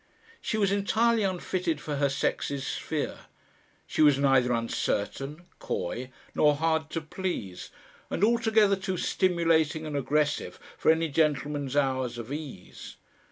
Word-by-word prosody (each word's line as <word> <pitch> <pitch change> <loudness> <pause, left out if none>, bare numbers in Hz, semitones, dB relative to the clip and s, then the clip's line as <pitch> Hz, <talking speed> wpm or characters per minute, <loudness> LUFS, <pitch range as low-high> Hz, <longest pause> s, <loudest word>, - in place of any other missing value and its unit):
She 220 - -2
was 200 -2 +2
entirely 220 +3 +2
unfitted 180 -4 -1
for 150 -2 -4
her 140 0 +2
sex's 135 0 -1
sphere. - - -4 0.6
She - - -1
was 145 -3 +6
neither 135 -3 +3
uncertain, 130 +6 -2
coy 125 +8 -3 0.2
nor 150 -1 +4
hard 160 +1 0
to 165 - -3
please, 155 - -5 0.4
and 190 - -2
altogether 220 -3 +4
too 190 -1 -3
stimulating 165 -4 +1
and 150 -1 -4
aggressive 145 +2 0 0.2
for - - +1
any 160 +1 +4
gentleman's 145 -2 0
hours 130 -4 0
of 120 +3 -6
ease. 145 - -8
155 Hz, 130 wpm, -28 LUFS, 135-180 Hz, 0.6 s, was